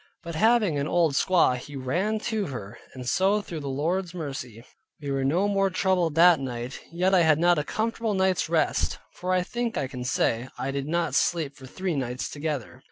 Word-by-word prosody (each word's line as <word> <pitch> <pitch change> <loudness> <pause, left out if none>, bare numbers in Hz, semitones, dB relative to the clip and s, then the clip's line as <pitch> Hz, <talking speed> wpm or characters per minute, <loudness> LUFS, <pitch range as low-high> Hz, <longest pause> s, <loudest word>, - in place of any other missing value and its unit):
But 170 0 -6
having 210 -3 +3
an 140 - -1
old 165 -4 +2
squaw 170 -3 +3
he 140 +3 -9
ran 175 +12 -1
to 220 -4 -1
her; 120 -4 -7 0.2
and 125 -1 -7
so 195 +8 +3
through 175 -5 -6
the 140 - -6
Lord's 170 +6 -1
mercy, 130 -8 -6 0.4
we 145 -2 -4
were 135 -1 0
no 170 +9 +2
more 195 -1 +2
troubled 185 -4 +1
that 170 -1 +7
night. 125 -1 -5
Yet 180 +3 +1
I 185 - +6
had 160 -2 +4
not 175 0 +4
a - - -1
comfortable 225 +2 -2
night's 190 -3 +1
rest; 165 -1 +1 0.2
for 180 +1 -4
I 185 -1 +2
think 235 +4 -3
I - - 0
can 130 -1 -6
say, 125 -1 0
I 135 - -2
did 140 0 -3
not 170 0 0
sleep 155 -5 +1
for 130 0 -12
three 185 +4 -3
nights 125 -2 -3
together. 145 -5 -4
165 Hz, 205 wpm, -26 LUFS, 135-185 Hz, 0.4 s, that